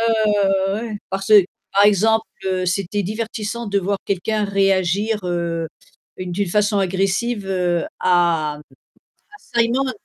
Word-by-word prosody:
Ouais, 230 - +1 0.2
ouais, 210 -1 +2
ouais, 195 0 +1
ouais, 215 - -3
ouais, 230 - -5
ouais, 210 - -5
parce 195 0 -3
que 210 -3 +8 0.3
par 200 +1 +5
exemple, 220 +2 +3 0.2
heu, 185 -1 -1
c'était 195 +2 -1
divertissant 220 +2 -4
de 200 -1 +1
voir 200 +1 -1
quelqu'un 210 +3 -1
réagir, 195 +1 +1
heu, 170 -2 -2 0.5
d'une 185 +1 -2
façon 210 +2 +1
agressive, 195 +3 0
heu, 180 -3 0 0.2
à 170 -4 +2
à 150 - -13 1.0
Simon. 255 +3 +2
195 Hz, 150 wpm, -20 LUFS, 180-210 Hz, 1.0 s, que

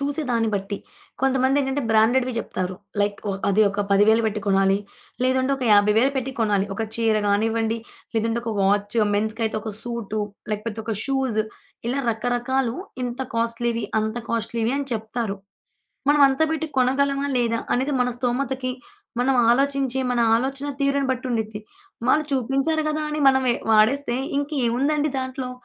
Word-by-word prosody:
చూసే 285 +2 -1
దాన్ని 230 -2 +1
బట్టి. 200 +1 -3 0.4
కొంతమందేం‌టంటే 270 +1 +2
బ్రాండెడ్‌వి 240 +4 +3
జెప్తారు 185 -4 -3 0.3
లైక్ 205 0 0 0.3
అది 200 +2 +4
ఒక 200 +1 -3
10,000 215 +3 +5
బెట్టి 215 0 -2
కొనాలి, 195 0 +3 0.4
లేదంటే 260 +1 +2
ఒక 260 - -4
50,000 210 +6 +4
పెట్టి 265 0 -1
కొనాలి. 205 -3 +2
ఒక 225 - -2
చీర 225 -1 +2
గానివ్వండి, 225 +2 +1 0.4
లేదంటే 225 +1 0
ఒక 230 - -2
వాచ్, 205 +2 +1 0.2
మెన్స్‌కయితే 220 +1 -1
ఒక 220 - -5
సూట్, 235 -3 -4 0.4
లేకపోతే 215 +1 -4
ఒక 225 0 -2
షూస్, 265 -5 0 0.5
ఇలా 260 +3 -1
రకరకాలు 245 +2 -1 0.3
ఇంత 245 +1 -4
కాస్ట్‌లీ‌వి, 230 0 -1 0.2
అంత 220 +1 -2
కాస్ట్‌లీవి 230 +1 -1
అని 285 - -3
చెప్తారు. 220 -1 -3 0.7
మనం 295 0 +5
అంత 270 +3 0
బెట్టి 320 0 -1
కొనగలమా? 275 +2 +2
లేదా 230 -1 +1
అనేది 265 +4 0
మన 250 - +2
స్తోమతకి 255 +1 -1 0.5
మనం 265 +2 +2 0.2
ఆలోచించే 270 0 +1
మన 245 -1 +1 0.2
ఆలోచన 270 +4 -2
తీరుని 275 0 +1
బట్టుండిద్ది. 225 -4 -3 0.5
వాళ్ళు 305 +4 +4
చూపించారు 275 +5 +1
గదా! 305 0 -1
అని 300 0 -2
మనం 265 -1 +3 0.3
వాడేస్తే 240 +4 +3 0.2
ఇంక 285 +1 -2 0.2
ఏముందండి 290 +5 +1
దాంట్లో? 260 0 -4
240 Hz, 140 wpm, -23 LUFS, 220-270 Hz, 0.7 s, 10,000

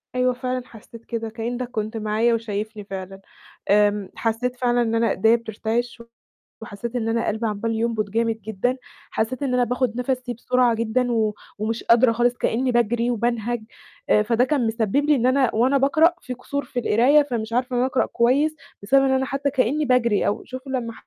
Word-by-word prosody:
أيوه 250 0 +2
فعلًا، 255 0 -3
حسيت 230 0 -14
كده 225 -1 -4
كأنك 240 +2 -4
كنت 220 0 -3
معايا 220 +2 +1
وشايفني 215 -1 -4
فعلًا، 195 -1 -8 0.5
امم 205 -1 +3
حسيت 235 +2 -1
فعلًا 245 -1 +1
إن 230 -1 0
أنا 230 -1 +2
إيديا 225 +4 +4
بترتِعِش 230 +1 -3 0.6
وحسيت 225 +3 -7
إن 225 -2 -1
أنا 230 0 0
قلبي 220 +2 -1
عمال 215 +2 -2
ينبُض 220 -2 -1
جامد 225 0 -1
جدًا، 220 +5 -2 0.3
حسيت 255 +6 -2
إن 255 -2 -1
أنا 250 0 +3
باخد 245 -1 -1
نَفَسي 250 -1 -2
بسرعة 245 0 +2
جدًا، 230 +2 0
و 220 -2 +1 0.3
ومش 225 +2 -2
قادرة 235 +1 +5
خالص 240 +1 +1
كأني 250 +3 0
باجري 240 +1 +1
وبانهج، 235 0 -1 0.5
أ 210 - +5
فده 230 +3 +2
كان 265 -5 +1
مسبّب 220 0 -1
لي 300 -1 +4
إن 245 -1 0
أنا 255 -3 +2
وأنا 260 +5 +3
باقرأ 310 +5 +4
في 250 0 -6
قصور 280 +3 -4
في 250 - -4
القراية 255 +7 +4
فمش 230 -5 -4
عارفة 250 +1 0
إن - - +1
أنا 255 - +2
أقرأ 255 - +1
كويس، 275 +6 +2 0.3
بسبب 270 +6 +4
إن 265 - +2
أنا 265 0 +1
حتى 275 +2 -1
كأني 285 +3 +1
باجري، 235 -4 +2
أو 205 - -1
شوف 255 +1 -9
لمّا 245 -4 -3
235 Hz, 190 wpm, -23 LUFS, 220-255 Hz, 0.6 s, قادرة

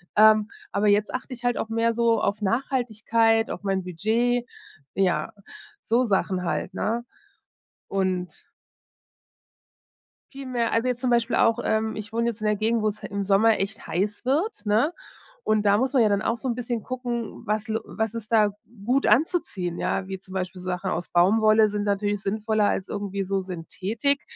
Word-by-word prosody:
ähm, 215 0 +6 0.2
aber 205 +1 +1
jetzt 205 +1 +2
achte 255 +1 -4
ich 245 0 -10
halt 245 0 +1
auf 225 - -3
mehr 230 +1 +1
so 230 0 +2
auf 210 +2 -1
Nachhaltigkeit, 225 -1 +1
auf - - -6
mein 195 -1 0
Budget. 230 +7 0 0.5
Ja, 180 -5 0 0.5
so 240 +3 +2
Sachen 190 -4 0
halt, 180 - -2
ne? 235 +2 -2 0.8
Und 185 -2 -2 1.9
Viel 275 0 -8
mehr. 240 -2 -1
Also, 230 +2 +1
jetzt 250 0 -1
zum 255 - 0
Beispiel 235 0 +2
auch, 230 +1 +3
ähm 220 -1 0
ich 215 +1 -7
wohne 235 0 +1
jetzt 235 -2 -3
in 215 - -1
'ner 210 - +2
Gegend, 220 +2 +1
wo's 215 0 -1
he - - -5
im 200 0 -3
Sommer 210 +3 +4
echt 200 +3 -3
heiß 205 +6 -2
wird, 300 - -1
ne? 225 +11 +2 0.5
Und 215 -1 +2
da 200 0 +5
muss 260 +4 +1
man 260 -5 +4
ja 215 - +4
dann 200 0 +1
auch 230 - 0
so 260 - -5
'n 240 - 0
bisschen 240 -2 -3
gucken, 240 -3 -4
was 215 0 -1
l 220 0 -1
was 220 0 -3
ist 230 -1 -7
da 210 -2 +4 0.3
gut 265 +3 +2
anzuziehen. 210 - +1
Ja, 185 - -1
wie 190 -1 -5
zum 185 0 -14
Beispiel 185 -1 -4
Sachen 185 +1 -3
aus 175 -1 -3
Baumwolle 215 +4 +5
sind 205 0 -2
natürlich 205 0 0
sinnvoller 215 +1 0
als 190 - -2
irgendwie 200 -1 -3
so 195 +1 -1
Synthetik. 195 - -1
215 Hz, 180 wpm, -25 LUFS, 200-235 Hz, 1.9 s, ähm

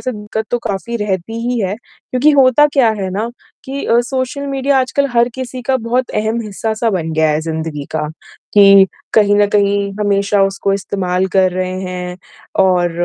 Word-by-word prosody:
से 255 - -3
दिक्कत 210 +1 -5
तो 245 - +1
काफ़ी 230 +1 -4
रहती 210 0 -3
ही 245 - 0
है, 190 -1 -1
क्योंकि 255 +4 -1
होता 275 +1 +5
क्या 265 -5 +4
है 190 - -2
ना 210 +5 -2 0.4
कि 275 +1 -5
अ, 235 - +3
सोशल 260 +3 -3
मीडिया 275 0 +1
आजकल 280 +2 0
हर 235 0 +3
किसी 255 -1 -6
का 260 +2 +1
बहुत 245 +1 -1
अहम 220 +2 -1
हिस्सा 215 +2 -3
सा 225 +1 0
बन 165 -5 -2
गया 160 0 +2
है 150 +1 0
ज़िंदगी 160 -2 -4
का, 155 -1 -2 0.5
कि 195 -1 +7 0.3
कहीं 205 -2 +4
न 205 0 +4
कहीं 200 -1 +1
हमेशा 200 0 +2
उसको 195 0 0
इस्तेमाल 190 -2 -1
कर 190 -1 +3
रहे 185 0 -2
हैं 180 -1 -5 0.5
और 180 -2 +2
205 Hz, 185 wpm, -16 LUFS, 190-245 Hz, 0.5 s, कि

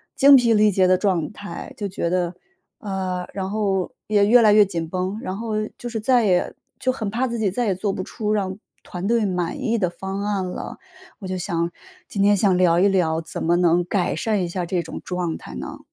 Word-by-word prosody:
精 280 0 +8
疲 240 -3 +5
力 215 0 +5
竭 190 -1 +3
的 185 - +4
状 180 -6 0
态， 205 +7 -8
就 205 -4 -3
觉 170 -2 -2
得 180 -1 0 0.5
呃， 185 -3 -3
然 190 -1 -3
后 195 -3 -1 0.2
也 205 -1 +3
越 240 +3 +7
来 215 -2 +6
越 210 -1 +7
紧 165 -4 -4
绷。 185 +3 -2
然 185 - -4
后 225 -1 -3
又 215 0 -2
就 245 - -7
是 230 - -4
再 245 0 +3
也 180 -3 +1 0.3
就 255 - +1
很 220 -5 -3
怕 240 +5 0
自 235 -1 -3
己 210 -3 +1
再 245 +4 -1
也 195 - +1
做 195 +2 -1
不 185 - -4
出 210 +2 -3
让 195 -2 -1 0.3
团 180 +1 -6
队 230 -2 +2
满 180 -3 -2
意 230 0 +1
的 185 -5 +1
方 190 +3 -5
案 200 -3 -1
了。 180 - -6 0.4
我 195 - -7
就 185 0 -3
想 170 -2 -2 0.4
今 200 - -2
天 205 +1 +5
想 190 -2 +3
聊 175 -2 +4
一 200 - +5
聊， 165 -4 +1
怎 160 - -6
么 170 +2 +3
能 175 0 +3
改 180 0 0
善 210 -4 0
一 - - -1
下 175 0 -3
这 175 0 -1
种 160 - -8
状 180 -3 -2
态 65 - -10
呢？ 65 - -7
190 Hz, 250 characters per minute, -22 LUFS, 180-215 Hz, 0.5 s, 精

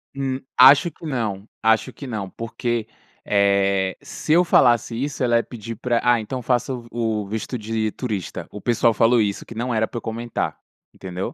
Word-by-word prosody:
Hum, 135 -1 -2 0.2
acho 140 +6 +8
que 165 - -13
não, 110 -8 -3 0.2
acho 110 0 +2
que 140 - -9
não, 105 -6 -4
porque, 115 +1 -3 0.4
eh, 100 -2 +2
se 155 - -2
eu 175 +2 +6
falasse 120 -9 +3
isso, 140 -1 -2
ela 120 -1 +3
ia 115 - +1
pedir 115 -1 -8
pra 120 0 0
"Ah, 120 -1 +4
então 125 +4 -5
faça 125 +2 0
o 125 - -5
v 115 - -15
o 110 -3 -1
visto 110 +4 -4
de 110 0 -2
turista". 105 -8 -4
O 105 - -8
pessoal 115 +1 +2
falou 115 +2 +4
isso, 100 -2 -2
que 115 - -11
não 120 +2 -2
era 110 0 +1
pra - - -7
eu - - -16
comentar, 115 +1 -3 0.4
entendeu? 95 0 -5
115 Hz, 195 wpm, -22 LUFS, 105-125 Hz, 0.4 s, acho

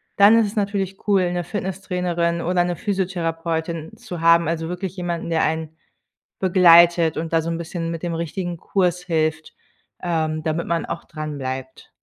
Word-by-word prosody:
dann 205 +3 +7
ist 225 - +3
es 205 - -8
natürlich 200 -2 -1
cool, 190 -3 +3
’ne 175 0 -1
Fitnesstrainerin 180 -2 -2
oder 175 +1 +1
’ne 175 -1 -2
Physiotherapeutin 170 -2 -2
zu 200 -8 -7
haben, 165 0 +5
also 165 0 -2
wirklich 185 +1 -4
jemanden, 175 -2 -3
der 165 -1 +2
einen 160 0 -2 0.7
begleitet 170 -3 +6
und 165 +1 -4
da 165 - +4
so 165 - -4
’n 165 - -2
bisschen 165 0 -4
mit 165 -1 -5
dem 175 -1 -3
richtigen 170 +2 -3
Kurs 180 0 0
hilft, 160 -2 -1 0.5
ähm, 160 -3 -1
damit 160 +2 -2
man 170 -1 0
auch - - -5
dranbleibt. 135 -4 -6
170 Hz, 165 wpm, -22 LUFS, 165-180 Hz, 0.7 s, dann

